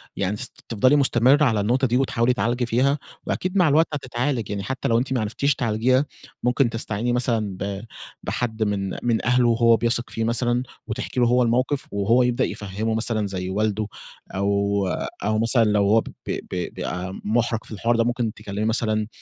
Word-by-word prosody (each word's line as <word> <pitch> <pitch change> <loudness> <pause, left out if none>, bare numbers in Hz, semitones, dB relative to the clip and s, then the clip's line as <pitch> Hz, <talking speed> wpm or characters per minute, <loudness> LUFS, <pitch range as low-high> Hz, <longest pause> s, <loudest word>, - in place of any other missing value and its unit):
يعني 100 +1 -1
تس - - -2 0.2
تفضلي 125 +5 +4
مستمرة 135 +1 +4
على 110 -5 +2
النقطة 125 +6 +2
دي، 120 +1 +2
وتحاولي 125 -2 +2
تعالجي 120 0 0
فيها، 130 +5 +2 0.3
وأكيد 185 +2 -2
مع 180 -3 +5
الوقت 155 +3 +4
هتتعالج 125 -3 -2
يعني 100 -1 -3
حتّى 130 +6 -3
لو 115 - +3
أنتِ 130 +3 -1
ما 125 - +1
عرفتيش 125 +7 0
تعالجيها، 125 +3 +2 0.4
ممكن 125 +1 +2
تستعيني 115 +1 -2
مثلًا 115 -6 0
ب 100 0 -3 0.4
بحد 110 -2 -2
من 100 -2 -1
من 115 -2 0
أهله 125 0 +3
هو 115 0 +4
بيثق 120 +1 0
فيه 115 - -3
مثلًا، 120 +2 +1 0.2
وتحكي 115 +3 -3
له 120 - +4
هو 125 +1 +4
الموقف، 130 +4 0
وهو 110 +5 +3
يبدأ 125 +1 +1
يفهمّه 105 +3 -3
مثلًا 110 -2 0
زي 95 -1 -4
والده، 105 +1 0 0.5
أو 100 0 +1 0.4
أو 110 +1 +1
مثلًا 115 +1 +4
لو 105 -1 +2
هو 110 +2 +5
ب - - -13 0.2
ب - - -3
بيبقى 90 +1 -4
محرج 115 +1 +1
في - - -14
الحوار 115 +3 0
ده، 115 - +3
ممكن 120 -2 -1
تكلّمي 100 +2 -4
مثلًا 110 -1 0
115 Hz, 180 wpm, -23 LUFS, 105-125 Hz, 0.5 s, مع